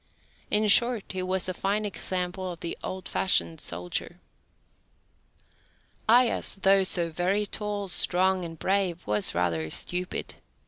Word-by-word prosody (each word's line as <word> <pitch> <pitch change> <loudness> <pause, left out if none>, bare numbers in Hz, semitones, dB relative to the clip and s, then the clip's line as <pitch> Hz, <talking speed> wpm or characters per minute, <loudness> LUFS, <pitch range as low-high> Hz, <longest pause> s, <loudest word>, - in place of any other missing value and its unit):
In 215 0 +2
short, 235 +1 +5
he 185 - -4
was 185 0 -1
a 185 - -3
fine 200 +4 -1
example 185 -2 -2
of 170 - -11
the 170 - -4
old 185 -1 -6
fashioned 85 - 0
soldier. 90 +1 -2 1.9
Aias, 240 +1 +4
though 195 0 +5
so 175 -3 +2
very 185 +5 0
tall, 205 -1 -3
strong, 185 +1 +3
and 165 -1 -8
brave, 185 -1 -1
was 105 -3 0
rather 85 -3 -1
stupid. 180 - -2
185 Hz, 130 wpm, -26 LUFS, 170-200 Hz, 1.9 s, short